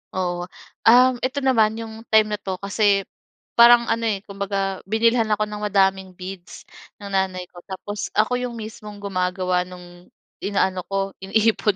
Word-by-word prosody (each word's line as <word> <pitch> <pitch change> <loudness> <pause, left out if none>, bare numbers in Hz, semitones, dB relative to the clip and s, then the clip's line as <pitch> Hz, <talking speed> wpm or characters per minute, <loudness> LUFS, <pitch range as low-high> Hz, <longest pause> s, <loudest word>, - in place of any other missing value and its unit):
Oo, 175 -1 -2 0.4
um, 250 +2 +7
ito 255 +3 -2
naman 220 -5 +3
'yong 225 0 -8
time 215 -1 +4
na 210 - -2
'to 190 -2 -4
kasi 200 0 +2 0.6
parang 235 0 +7
ano, 230 0 0
eh, 205 -2 -1
kumbaga 195 -1 -3
binilhan 230 +2 +2
ako 215 0 0
ng 210 0 -6
madaming 190 -1 +1
beads 185 0 -9 0.4
ng 200 -1 -7
nanay 190 -1 0
ko 175 - -12
tapos 205 +2 -5
ako 220 +4 +2
'yong 250 -1 -4
mismong 215 -2 -9
gumagawa 185 -1 -1
no'ng 180 -1 -13 0.3
inaano 190 -2 -1
ko 195 0 -2
iniipon 210 +1 +1
200 Hz, 155 wpm, -22 LUFS, 190-220 Hz, 0.6 s, um